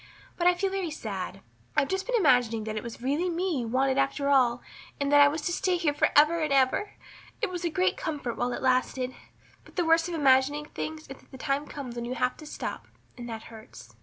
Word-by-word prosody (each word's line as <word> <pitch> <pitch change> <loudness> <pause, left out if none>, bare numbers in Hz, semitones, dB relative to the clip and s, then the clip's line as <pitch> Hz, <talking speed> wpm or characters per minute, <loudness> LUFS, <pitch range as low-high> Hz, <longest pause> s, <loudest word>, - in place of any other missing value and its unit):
But 350 - +1
I 360 - +5
feel 385 +2 -1
very 385 -3 -2
sad. 195 -9 -5 0.4
I've 275 - +4
just 380 +2 -2
been - - 0
imagining 245 - +3
that 215 0 -4
it 215 - -2
was 235 +1 -9
really 295 +8 0
me 345 -3 -1
you 235 - -3
wanted 265 +3 +1
after 275 +1 0
all 250 -3 +3 0.4
and 280 0 0
that 290 0 +7
I 285 - +8
was 300 +2 -2
to 350 - -1
stay 360 +1 +1
here 325 -4 +1
for 290 - +2
ever 305 +3 +6
and 305 -2 -1
ever. 275 +10 +2 0.5
It - - -1
was 355 -1 -5
a 340 - +1
great 370 +3 +1
comfort 290 -8 -3
while 245 +1 -1
it 240 - -4
lasted. 255 0 +1 0.5
But - - -19
the 350 - +1
worst 325 +1 +4
of 345 - -3
imagining 285 0 +3
things 310 +1 -6
is 270 -3 -11
that - - -24
the 265 - -11
time 275 +2 -1
comes 260 -5 -7
when 235 - -3
you 250 +1 -4
have 250 +1 0
to 305 - -11
stop - - -6 0.3
and 240 -1 -8
that 225 -1 -6
hurts." 120 - -13
280 Hz, 240 wpm, -28 LUFS, 250-330 Hz, 0.5 s, I